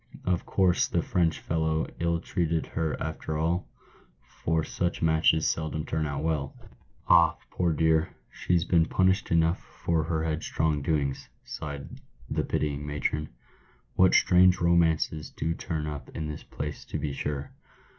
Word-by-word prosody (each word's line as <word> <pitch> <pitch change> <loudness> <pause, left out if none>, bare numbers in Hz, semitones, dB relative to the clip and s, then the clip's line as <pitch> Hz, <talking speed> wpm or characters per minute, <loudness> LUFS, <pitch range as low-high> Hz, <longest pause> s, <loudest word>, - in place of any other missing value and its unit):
Of 90 -2 0
course 95 -3 +3
the - - 0
French 85 -3 +1
fellow 80 -1 0
ill 85 0 +1
treated 85 -2 -1
her 80 -2 -2
after 80 -1 -4
all? 85 +3 0 0.6
for 80 -1 -2
such 85 +2 -2
matches 80 0 +3
seldom 80 -1 -2
turn 80 -1 -1
out 70 0 -3
well." 75 -4 -1 0.3
" - - -34
Ah! - - +5
poor 90 -2 +1
dear, 80 +1 +2 0.2
she's 85 -2 0
been 85 -2 +3
punished 95 +1 +2
enough 85 +1 +3
for 80 -2 -2
her 80 -1 -1
headstrong 80 -1 -1
doings," 70 -2 -1
sighed 70 -2 -7 0.3
the - - -1
pitying 75 -1 -2
matron. 75 +1 -2 0.6
"What 95 0 +5
strange 90 0 +5
romances 80 -3 +2
do 80 - -2
turn 80 -2 -4
up 75 -1 -6
in 80 -1 -3
this 75 -1 -6
place 75 0 -6
to - - -4
be 75 -2 -3
sure 70 0 -4
80 Hz, 150 wpm, -28 LUFS, 75-85 Hz, 0.6 s, Ah